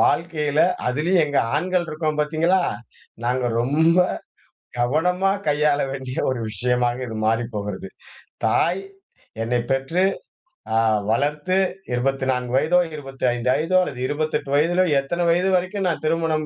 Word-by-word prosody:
வாழ்க்கையில. 150 -2 +1 0.3
அதிலயும் 165 +7 +2
எங்க 145 -1 0 0.2
ஆண்கள் 180 +2 0
இருக்கோம் 155 -1 -2
பார்த்தீங்களா? 165 +5 +2 0.6
நாங்க 125 0 0
ரொம்ப 160 +7 +3 0.8
கவனமா 180 +9 +2 0.2
கையாள 145 0 +2
வேண்டிய 130 -1 -6
ஒரு 130 -2 -2
விஷயமாக 120 +2 0
இது 110 - -6
மாறி 115 +2 +2
போகிறது. 100 -2 -4 0.6
தாய் 180 +3 +2 0.6
என்னை 120 +1 0
பெற்று 135 +8 +1 0.7
அ - - +3 0.3
வளர்த்து 150 +9 0 0.4
24 130 -1 -1
வயதோ 165 +6 +3 0.2
25 130 -3 -2
வயதோ 180 +4 +1
அல்லது 135 -7 -5
28 150 -1 -2
வயதிலோ 175 +5 +3 0.2
எத்தனை 170 +6 -2
வயது 180 +3 +2
வரைக்கும் 185 +2 -1
நான் 165 - -1
திருமணம் 160 -1 0
150 Hz, 120 wpm, -22 LUFS, 125-170 Hz, 0.8 s, ரொம்ப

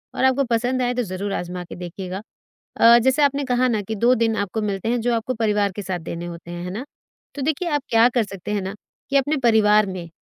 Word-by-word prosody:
और - - -1
आपको 265 +1 +3
पसंद 245 +2 +1
आए 245 0 +1
तो 250 0 -1
ज़रूर 195 0 -4
आज़मा 180 0 -4
के 175 - -10
देखिएगा। 180 +2 -6 0.6
अ, 235 +1 +7
जैसे 265 +5 +2
आपने 280 0 +2
कहा 255 -1 +2
ना 220 -4 0
कि 220 +3 -4
2 240 +5 +4
दिन 225 -2 +1
आपको 205 +2 -2
मिलते 200 0 -2
हैं 240 +1 +1
जो 240 +1 +1
आपको 230 +3 -2
परिवार 210 -3 +1
के 205 - -6
साथ 185 -2 -3
देने 170 +1 -6
होते 170 0 -9
हैं, 175 0 -6
है 180 - -5
ना? 220 +8 -5 0.5
तो 285 - -5
देखिए 315 +5 -1
आप 295 -3 0
क्या 230 +1 +6
कर 240 -2 +1
सकते 195 -1 -8
हैं 205 -2 -1
ना 190 +2 -5 0.4
कि 280 - +2
अपने 290 +3 +2
परिवार 215 -3 +4
में 185 -3 -6
220 Hz, 245 wpm, -22 LUFS, 190-250 Hz, 0.6 s, अ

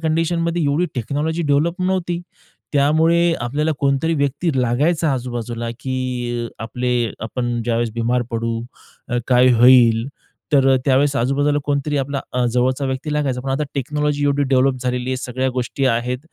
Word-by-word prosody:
कंडिशनमध्ये 165 +1 0
एवढी 145 +5 +1
technology 145 +7 -2
develop 155 +4 +1
नव्हती. 180 -2 -1 0.5
त्यामुळे 160 +4 +3
आपल्याला 145 +6 -1
कोणतरी 140 +4 +1
व्यक्ती 145 +3 0
लागायचा 145 +6 +1
आजूबाजूला, 120 -2 -4
की 125 -2 -3
अ, 110 - -11
आपले 125 -1 -1
आपण 120 +1 -2
ज्यावेळेस 120 0 0
बिमार 120 +1 0
पडू 115 0 -2 0.5
तर 120 - +1
काय 125 0 +5
होईल. 120 -1 +5 0.5
तर 135 -2 +4
अ, - - +5
त्यावेळेस 140 +1 +3
आजूबाजूला 145 +4 +1
कोणतरी 145 0 -1
आपला 140 0 -2
अ, 125 0 +1
जवळचा 130 +3 +1
व्यक्ती 130 +3 -3
लागायचा, 140 -4 -1
पण 135 +1 -4
आता 135 +3 0
टेक्नॉलॉजी 145 +1 -1
एवढी 145 0 +2
डेव्हलप 130 0 +3
झालेली 125 0 -2
आहे, 130 - -1
सगळ्या 130 +1 -2
गोष्टी 125 +2 -2
आहेत. 125 +1 0
130 Hz, 150 wpm, -20 LUFS, 125-150 Hz, 0.5 s, काय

